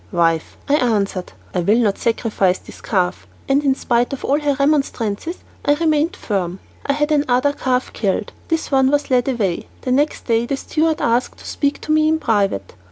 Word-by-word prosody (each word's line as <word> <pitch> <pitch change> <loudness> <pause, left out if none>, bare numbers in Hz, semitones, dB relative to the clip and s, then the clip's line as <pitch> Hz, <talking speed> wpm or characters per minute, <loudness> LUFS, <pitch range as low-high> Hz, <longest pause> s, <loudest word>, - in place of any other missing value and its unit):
"Wife," 165 -3 +1
I 290 +1 +4
answered, 205 -7 0 0.2
"I 180 - 0
will 200 +6 +3
not 215 -5 +1
sacrifice 215 -5 +1
this - - -14
calf," 185 -4 -1 0.2
and 275 +2 +2
in 270 -2 +3
spite 240 0 0
of 275 - -5
all 285 +2 +2
her 290 -2 +1
remonstrances, 280 - 0 0.2
I 290 - +3
remained 315 +2 +1
firm. 185 -4 -2 0.3
I 280 - +3
had 295 +2 0
another 285 -1 +2
calf 255 -2 -1
killed; 205 0 -1 0.2
this 325 -2 -1
one 265 -1 +4
was 290 0 0
led 250 -1 +3
away. 210 -10 -1
The 255 - -2
next 290 +4 +1
day 230 0 +1
the 275 - -1
steward 315 +2 0
asked 235 +2 +1
to - - -14
speak 285 -1 -1
to 310 - -3
me 310 0 +4
in 315 0 +3
private. 200 - 0
255 Hz, 190 wpm, -20 LUFS, 205-290 Hz, 0.3 s, I